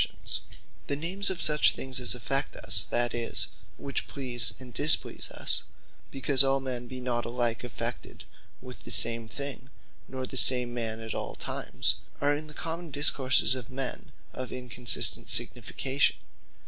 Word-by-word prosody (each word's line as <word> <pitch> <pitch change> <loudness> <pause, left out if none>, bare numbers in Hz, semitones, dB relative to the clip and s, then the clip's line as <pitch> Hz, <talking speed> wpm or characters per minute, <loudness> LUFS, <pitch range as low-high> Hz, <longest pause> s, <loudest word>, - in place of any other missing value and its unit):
Inconstant - - -4
Names - - -15 0.3
The 140 - -2
names 185 +7 +1
of 190 -2 -4
such 150 -1 +3
things 130 0 +1
as 125 0 +5
affect 135 +4 -3
us, - - +5
that 120 0 -1
is, 120 -1 +3 0.3
which 140 - -4
please, 125 -4 -1
and 125 -2 -12
displease 150 +5 +5
us, - - +4 0.4
because 135 0 +2
all 135 0 0
men 125 -2 -6
be 130 +1 -9
not 125 -1 -3
alike 120 -1 -3
affected 125 -4 -7 0.4
with 125 -1 -11
the - - -11
same 115 -1 +1
thing, 135 +2 -7 0.4
nor 130 0 -7
the 130 - -9
same 125 -2 +4
man 115 -2 -5
at 110 0 -7
all - - -6
times, - - -3 0.2
are 145 +1 0
in 155 +1 -8
the 150 - -12
common 165 +1 -6
discourses 135 -3 +2
of 130 -3 -6
men, 130 0 -7 0.2
of 130 -1 -8
Inconstant 125 -1 +1
signification. 135 +1 0
130 Hz, 160 wpm, -26 LUFS, 120-140 Hz, 0.4 s, as